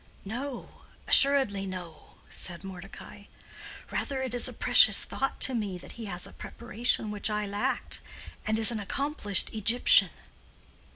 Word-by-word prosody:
"No, 245 +5 -8 0.3
assuredly 265 -9 +4
no," 180 -4 -11
said 175 0 -4
Mordecai. 195 +2 -12 0.7
"Rather 265 -1 -4
it 260 - -6
is 245 - +1
a - - -6
precious - - +6
thought 270 - -4
to 260 - +4
me 205 -6 -4
that 175 - -13
he 230 - -10
has 180 -3 -4
a - - -13
preparation 235 -2 -4
which 210 +1 -2
I 210 0 -3
lacked, 205 +1 -3 0.4
and 220 0 -2
is 220 +1 +3
an 225 - -5
accomplished 240 -1 +1
Egyptian." 225 +3 +4
215 Hz, 140 wpm, -26 LUFS, 195-245 Hz, 0.7 s, precious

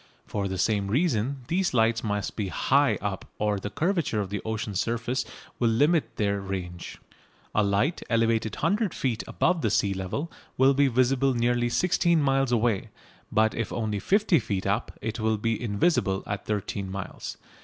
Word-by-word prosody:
For 100 -2 -2
the 95 0 -3
same 100 +1 +1
reason 130 - 0
these 175 -2 0
lights 115 0 +3
must 105 -2 -2
be 105 -3 -2
high 140 +9 +2
up, 100 -1 -3
or 105 -1 0
the 105 - -4
curvature 165 - 0
of 100 -2 -3
the 100 - -2
ocean's 110 -3 -3
surface 120 +2 -1 0.3
will 120 - +3
limit 145 +8 +2
their 100 -1 0
range. 90 -3 -6 0.6
A 105 - +3
light 105 - +1
elevated 115 -2 +1
100 200 +3 0
feet 120 -5 -1
above 175 -3 +1
the 110 - +1
sea 100 -1 +2
level 95 - -4 0.3
will 135 +1 +5
be 140 +1 +4
visible 130 +1 +2
nearly 120 0 +1
16 170 +3 +2
miles 135 -2 +2
away, 115 -4 +1 0.4
but 110 0 +3
if 115 - -3
only 110 -3 -2
50 200 - +3
feet 100 -4 -3
up 100 +1 0
it 110 +1 -3
will 110 0 +1
be 115 +1 -1
invisible 100 - +1
at 100 -1 -5
13 100 -2 -2
miles. 95 -1 -6
115 Hz, 170 wpm, -27 LUFS, 100-135 Hz, 0.6 s, will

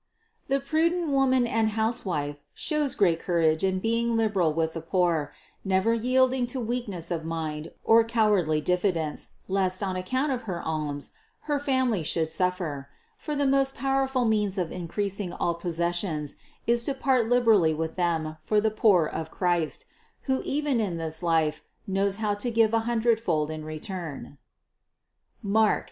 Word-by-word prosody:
The 275 +1 +1
prudent 325 +4 +1
woman 260 -2 +3
and 225 -1 +1
housewife 180 -10 -1 0.2
shows 300 -3 -1
great 170 -5 +3
courage 165 -2 +1
in 190 -1 +2
being 230 +3 0
liberal 200 -7 +2
with 160 +1 -1
the 165 - -5
poor, 165 -3 0 0.3
never 190 +4 +2
yielding 255 +2 +2
to 255 +2 -4
weakness 225 -8 -3
of 165 -2 -2
mind, 160 -1 -4
or 225 0 +6
cowardly 210 -9 +2
diffidence, 180 -3 -1
lest, 190 0 0
on 190 -1 -1
account 255 +11 -1
of 250 -2 -1
her 175 -2 -2
alms, 150 -3 -3 0.3
her 295 -2 -1
family 260 -8 +1
should 160 +1 0
suffer; 170 -7 -2 0.3
for 300 - -5
the 285 0 +1
most 270 0 +2
powerful 270 -2 +1
means 210 -3 +1
of 175 -3 -1
increasing 190 +1 -3
all 170 - 0
possessions 170 -2 -2 0.3
is 235 0 +3
to 280 - 0
part 255 -4 +1
liberally 220 -10 +4
with 160 +1 -3
them 160 -3 -1
for 210 +7 +1
the 215 +1 +1
poor 205 -6 +4
of 160 +1 -4
Christ, 175 -3 0 0.4
who 265 -1 0
even 285 -3 0
in 185 -6 -2
this 160 0 -4
life 160 -3 +1 0.2
knows 195 0 0
how 210 -1 0
to 205 +4 -3
give 225 -1 +3
a 225 - +4
hundredfold 220 -10 +1
in 155 0 -6
return 155 -2 -7 1.0
(Marc. 215 +1 +3
195 Hz, 155 wpm, -27 LUFS, 165-235 Hz, 1.0 s, or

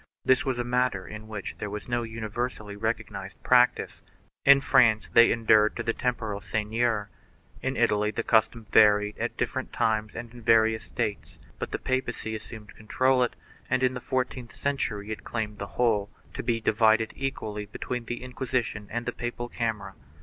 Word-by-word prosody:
This 130 - +4
was 130 -3 -1
a 120 - -1
matter 125 -6 0
in 110 0 -9
which 105 -3 -6
there 105 - -4
was 105 +1 -6
no 120 -1 0
universally 110 -1 -4
recognized 100 -3 -4
prac 125 0 +5
tice. - - -8 0.4
In 140 0 +8
France 110 -5 +4
they 115 0 +7
enured 110 -2 +4
to - - -3
the 115 - 0
temporal 110 -5 -2
seigneur. 110 +1 -1 0.5
In 130 0 -2
Italy 105 -3 +2
the 110 +2 -3
custom 115 0 +2
varied 105 -1 +5
at 120 +1 -3
different 130 +2 -2
times 110 -2 0
and 120 -1 -7
in 120 - -13
the - - -14
various 110 -1 +4
states, 110 -4 -4 0.2
but - - -3
the - - -2
papacy 130 -3 -2
assumed 110 -1 -9
to - - -12
control 130 +4 +1
it 125 - 0 0.3
and, 130 0 +1
in 130 0 +3
the 125 - -5
fourteenth 125 -2 -3
cen 140 0 -1
tury, 105 -4 -3
it 110 - -5
claimed 110 -2 -4
the 100 - -4
whole, 110 -4 +2 0.2
to - - -4
be 115 -1 0
divided 110 0 +3
equally 105 -6 -4
between 120 +3 -5
the 120 +2 -5
Inquisition 125 -4 -3
and 120 +2 -3
the 125 - -1
papal 120 0 -4
camera. 110 -5 -3
115 Hz, 185 wpm, -27 LUFS, 105-125 Hz, 0.5 s, In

